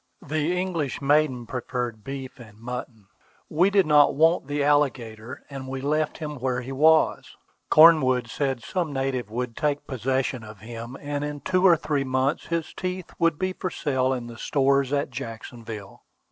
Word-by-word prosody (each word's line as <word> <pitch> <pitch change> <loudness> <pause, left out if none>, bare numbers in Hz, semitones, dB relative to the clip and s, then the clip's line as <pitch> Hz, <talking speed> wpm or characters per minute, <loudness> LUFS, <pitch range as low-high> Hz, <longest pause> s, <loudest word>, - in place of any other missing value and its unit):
The 155 +4 0
English 170 -7 -2
maiden 140 -3 +2
preferred 120 -2 -4
beef 135 0 -7
and 110 -3 -13
mutton. 115 -2 -7 0.4
We 175 +5 +3
did 200 -1 +3
not 150 -1 +5
want 165 0 +3
the 145 0 -1
alligator, 130 -6 0
and 135 -2 -8
we 135 0 -4
left 150 +3 -1
him 150 -2 -5
where 125 0 -1
he 130 +2 -7
was. 155 +4 +3 0.3
Cornwood 135 -7 +6
said 135 -1 -2
some 175 -5 -2
native 135 -4 -2
would 120 +1 -4
take 145 -1 -1
possession 130 -1 -1
of 105 -3 -12
him, 115 +3 -8
and 145 0 -3
in 145 -1 -5
two 185 +6 +3
or 170 -2 +6
three 150 -3 -1
months 130 +2 0
his 170 -1 -2
teeth 185 -1 -5
would 165 -2 +2
be 185 +2 -1
for 185 - -4
sale 130 -6 0
in 125 -2 -2
the 120 0 -10
stores 140 -1 +2
at 140 -1 0
Jacksonville. 115 -4 -8
135 Hz, 170 wpm, -25 LUFS, 125-155 Hz, 0.4 s, Cornwood